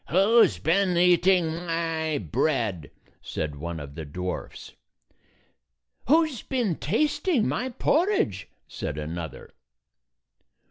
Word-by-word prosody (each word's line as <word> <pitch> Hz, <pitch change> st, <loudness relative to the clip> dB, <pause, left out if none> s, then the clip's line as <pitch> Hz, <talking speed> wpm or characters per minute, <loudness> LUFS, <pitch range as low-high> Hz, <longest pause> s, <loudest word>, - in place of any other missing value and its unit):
"Who 205 Hz, +7 st, +5 dB
's 95 Hz, -, +1 dB
been 180 Hz, -, +1 dB
eating 175 Hz, -1 st, +4 dB
my 165 Hz, -2 st, -1 dB
bread?" 105 Hz, -, -1 dB, 0.3 s
said 75 Hz, -2 st, -4 dB
one 85 Hz, +2 st, -5 dB
of 70 Hz, -1 st, -9 dB
the 80 Hz, -, -6 dB
dwarfs. 90 Hz, +5 st, -6 dB, 1.4 s
"Who 320 Hz, +5 st, +5 dB
's 270 Hz, -7 st, -7 dB
been 235 Hz, -, -1 dB
tasting 285 Hz, -, +1 dB
my 255 Hz, -, -1 dB
por 310 Hz, -, +1 dB
ridge?" 100 Hz, -, -1 dB, 0.2 s
said 75 Hz, -, -5 dB
another. 80 Hz, -2 st, -6 dB
160 Hz, 110 wpm, -26 LUFS, -, 1.4 s, Who